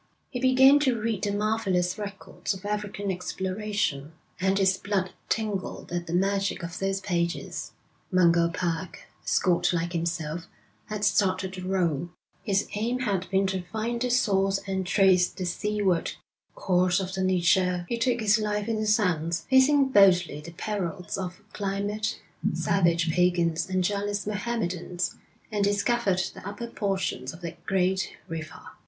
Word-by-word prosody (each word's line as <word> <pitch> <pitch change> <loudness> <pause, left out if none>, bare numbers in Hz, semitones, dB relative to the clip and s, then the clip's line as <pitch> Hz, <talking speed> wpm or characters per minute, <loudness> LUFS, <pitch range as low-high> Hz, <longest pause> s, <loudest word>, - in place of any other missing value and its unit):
He 250 - -3
began 265 +2 +6
to 260 -5 +1
read 215 -3 -1
the 205 - +1
marvellous 200 -4 0
records 200 0 -4
of 190 +1 -11
African 205 -1 -2
exploration, 185 -5 -2 0.3
and 190 +1 +2
his 190 -1 +4
blood 190 -2 -1 0.2
tingled 210 -6 -2
at 175 0 -3
the 165 - -4
magic 195 0 0
of 170 +1 -5
those 195 0 0
pages. 170 -3 -2 0.4
Mungo 170 -2 +4
Park, 175 -1 -3 0.2
a - - -21
Scot 175 -1 +2
like 170 0 -1
himself, 165 0 -2 0.4
had 210 -1 -2
started 190 -2 +1
the 185 - -6
roll. 175 -4 0 0.3
His 200 -3 0
aim 235 +4 -1
had 195 -6 -1
been 195 0 +2
to 190 -1 -1
find 225 +6 -3
the 250 - +1
source 195 -5 +2
and 190 -2 -2
trace 185 -2 +4
the 185 - -5
seaward 195 -1 0 0.4
course 180 0 +2
of 190 -1 -4
the 190 - -2
Niger. 180 -1 +2
He 235 +3 -2
took 240 0 +1
his 215 +1 +4
life 210 -1 -1
in 225 -1 0
his 215 0 +3
hands, 170 -5 0
facing 270 +1 +5
boldly 180 - +4
the 170 +2 -10
perils 180 -2 -3
of 185 +1 -5
climate, 205 +2 -2 0.4
savage 170 -3 +2
pagans, 175 0 +2
and 185 -1 +1
jealous 205 +1 -1
Mohammedans, 185 -5 -2 0.3
and 205 -1 0
discovered 200 -1 +2
the - - -11
upper 205 +4 -5
portions 195 - -2
of 165 - -12
that 170 -1 -7
great 190 0 0
river. 160 -3 -6
190 Hz, 150 wpm, -27 LUFS, 180-210 Hz, 0.4 s, began